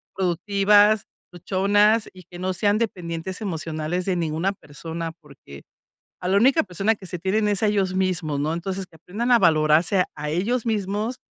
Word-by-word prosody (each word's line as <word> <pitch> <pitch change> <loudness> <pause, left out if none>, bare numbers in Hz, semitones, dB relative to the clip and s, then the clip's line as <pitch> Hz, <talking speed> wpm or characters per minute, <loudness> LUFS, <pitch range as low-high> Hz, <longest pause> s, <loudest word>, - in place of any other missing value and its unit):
productivas, 200 +3 +3 0.3
luchonas 205 +5 +2
y 185 -1 -14
que 175 +1 -12
no 185 +1 -1
sean 205 +3 +1
dependientes 180 -4 -4
emocionales 165 -2 -3
de 190 - 0
ninguna 165 +3 -1
persona, 165 0 -7
porque 140 - -14 0.6
a 180 - -2
la 195 - +3
única 270 +9 +4
persona 195 +3 0
que 195 -2 -13
se 180 - -5
tienen 210 +4 0
es 205 0 0
a - - +4
ellos 195 -3 0
mismos, 180 -6 -1
¿no? 150 +2 -1
Entonces, 185 +3 -4
que 160 - -19
aprendan 215 +10 -2
a 240 - +7
valorarse 165 +1 +3
a 150 0 -5
ellos 220 +9 -1
mismos, 210 +2 -1
185 Hz, 170 wpm, -23 LUFS, 165-205 Hz, 0.6 s, a